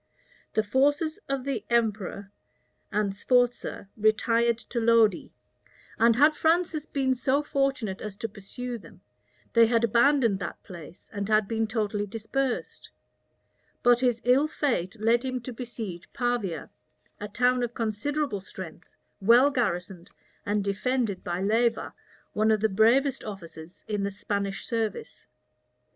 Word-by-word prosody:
The 215 - +3
forces 290 - +1
of 275 -2 -1
the 275 0 -3
emperor 210 -4 -1 0.6
and 205 -2 0
Sforza 245 -2 0
retired 230 +2 +2 0.2
to 240 - +1
Lodi; 225 -4 +3 0.7
and 230 0 +5
had 295 +5 +5
Francis 325 -1 +1
been 265 -2 +1
so 265 +3 +1
fortunate 275 -9 -1
as 210 -2 -6
to 225 - -4
pursue 235 +4 -7
them, 180 -1 -16 0.5
they 230 -1 +6
had 230 0 +2
abandoned 235 -2 +3
that 180 - -6
place, 175 -2 -12
and 200 0 -3
had 215 -1 +3
been 225 0 -1
totally 210 -2 -2
dispersed;[*] 235 +5 -3 0.9
but 245 -1 +5
his 245 -2 +1
ill 260 +5 +4
fate 235 - -2
led 230 +3 +3
him 255 -1 -2
to 250 +1 -7
besiege 225 -7 -7
Pavia, 235 -10 -2 0.5
a 210 - -5
town 250 +4 +2
of 240 -1 -3
considerable 230 +2 -2
strength, 185 -3 -10 0.3
well 240 +8 +6
garrisoned, 180 -8 -2 0.4
and 205 0 +1
defended 210 0 -1
by 175 +2 -2
Leyva, 230 +3 +1 0.4
one 215 +1 +2
of 215 -2 +3
the 220 - +3
bravest 245 +7 +3
officers 175 -4 -9
in 210 -2 -2
the 200 - 0
Spanish 200 0 -3
service. 225 -3 -4
225 Hz, 135 wpm, -27 LUFS, 200-250 Hz, 0.9 s, they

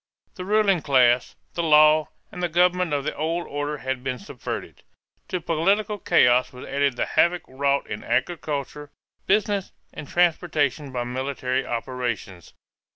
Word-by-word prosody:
The 180 - -7
ruling 200 -3 +3
class, 125 -4 +3 0.2
the 170 - -2
law, 155 -1 +5 0.2
and - - -7
the 175 - 0
government 180 0 +2
of 145 -1 0
the 155 - -3
old 165 +3 -2
order 145 +1 -3
had 130 -1 -4
been 130 -1 -2
subverted. 100 - -7 0.5
To 180 - -2
political 195 +6 0
chaos 125 -6 +3
was 125 - -10
added 140 -2 0
the - - -1
havoc 175 +1 +2
wrought 140 +1 0
in 105 - -6
agriculture, 145 +2 -2 0.4
business, 205 -1 +1 0.2
and 150 - -8
transportation 155 -5 +1
by 125 -1 -2
military 130 +1 -2
operations. 120 - -4
145 Hz, 145 wpm, -24 LUFS, 130-175 Hz, 0.5 s, law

